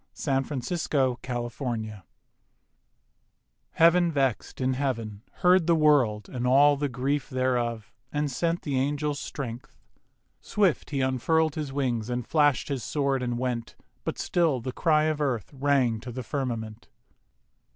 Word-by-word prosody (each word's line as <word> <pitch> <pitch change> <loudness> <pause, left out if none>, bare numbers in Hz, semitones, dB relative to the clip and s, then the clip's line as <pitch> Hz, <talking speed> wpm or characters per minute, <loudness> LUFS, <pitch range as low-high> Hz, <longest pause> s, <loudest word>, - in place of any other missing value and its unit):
1882. 135 -1 -1
THE 120 -2 -3
THREE 135 - -5
ANGELS 110 -4 -4 1.7
Heav'n 170 +1 +5
vex'd 135 -5 -1
in 130 0 +1
heaven 115 -6 -3 0.2
heard 180 -1 +5
the 170 - +5
World 135 -10 +3
And 125 -1 -3
all 145 +3 +6
the 145 0 -2
grief 135 +2 -1
thereof, 120 -4 -1 0.2
and 145 -1 -1
sent 170 +5 -1
The 140 -4 0
angel 145 +2 0
Strength. 130 -4 -7 0.6
Swift 200 -6 0
he 140 -2 -1
unfurl'd 145 +5 +1
His 150 -3 -4
wings 125 -5 -1
and 125 -1 -3
flasht 145 -4 +2
his 135 -4 -2
sword 140 -3 0
and 120 -1 -2
went: 120 -2 -3 0.3
But - - -3
still 165 -7 +1
the 130 +2 -4
cry 155 0 +3
of 155 -1 0
Earth 130 -5 -2
rang 135 -5 +2
to 120 +2 -8
the 130 +2 -5
firmament. 115 -5 -4
135 Hz, 140 wpm, -27 LUFS, 120-150 Hz, 1.7 s, all